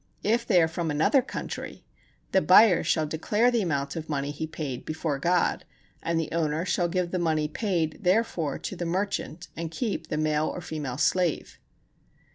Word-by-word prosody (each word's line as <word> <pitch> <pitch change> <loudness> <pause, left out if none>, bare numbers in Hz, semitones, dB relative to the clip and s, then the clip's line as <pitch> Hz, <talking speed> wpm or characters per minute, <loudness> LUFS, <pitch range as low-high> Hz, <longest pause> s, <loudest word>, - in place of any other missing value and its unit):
If 230 +3 +1
they 185 -5 +5
are - - +3
from 165 0 -3
another 155 - +3
country, 255 - -6 0.5
the 190 - +4
buyer 185 -1 +6
shall 155 - +1
declare 210 +10 +1
the 235 -2 +2
amount 140 -7 -1
of 160 -1 -6
money 140 -1 -1
he 160 +2 -4
paid 145 -5 -5
before 155 -3 -3
God, 175 +4 +1 0.4
and 165 0 0
the 160 - -3
owner 160 0 0
shall 175 -1 +1
give 180 0 -1
the 185 - -1
money 155 -3 +1
paid 165 -2 -1
therefor 180 -7 +1
to - - -6
the 175 - -4
merchant, 180 -2 -3
and 165 0 -4
keep 180 -2 -3
the 150 - -2
male 155 0 +1
or - - -4
female 150 -7 -5
slave. 175 +1 0
165 Hz, 180 wpm, -27 LUFS, 155-185 Hz, 0.5 s, buyer